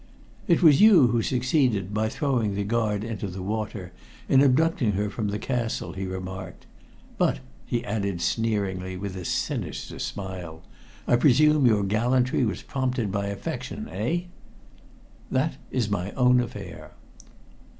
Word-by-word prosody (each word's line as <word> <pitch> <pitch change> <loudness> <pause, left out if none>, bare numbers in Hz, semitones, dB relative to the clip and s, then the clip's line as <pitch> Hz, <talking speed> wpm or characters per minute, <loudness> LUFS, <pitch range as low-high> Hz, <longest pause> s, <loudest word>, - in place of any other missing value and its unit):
"It 170 0 +3
was 150 -1 +7
you 195 - +7
who 120 0 +1
succeeded, 125 - +1
by 110 +1 0
throwing 120 -7 0
the 100 - -1
guard 105 -1 0
into 110 -2 -4
the 95 0 -6
water, 105 -3 -4 0.4
in 135 - +5
abducting 140 -4 +3
her 100 +1 -1
from 110 -2 -3
the 100 +1 -2
castle," 115 +1 -2
he 95 0 -4
remarked. 95 0 -7 0.5
"But," - - +2 0.3
he 120 0 -2
added 100 -5 -2
sneeringly, 95 -2 -1
with 95 0 -5
a 90 - -6
sinister - - -3
smile, 90 -5 -6 0.4
"I 120 - +4
presume 150 +2 +5
your 105 -3 +3
gallantry 125 +6 +1
was 105 -5 -2
prompted 125 -6 -2
by 100 0 -1
affection 100 0 -5
eh?" 115 - -1 1.1
"That 135 +5 0
is 120 -5 0
my 100 -1 -2
own 125 -1 +4
affair." 100 -7 -6
110 Hz, 140 wpm, -25 LUFS, 100-125 Hz, 1.1 s, was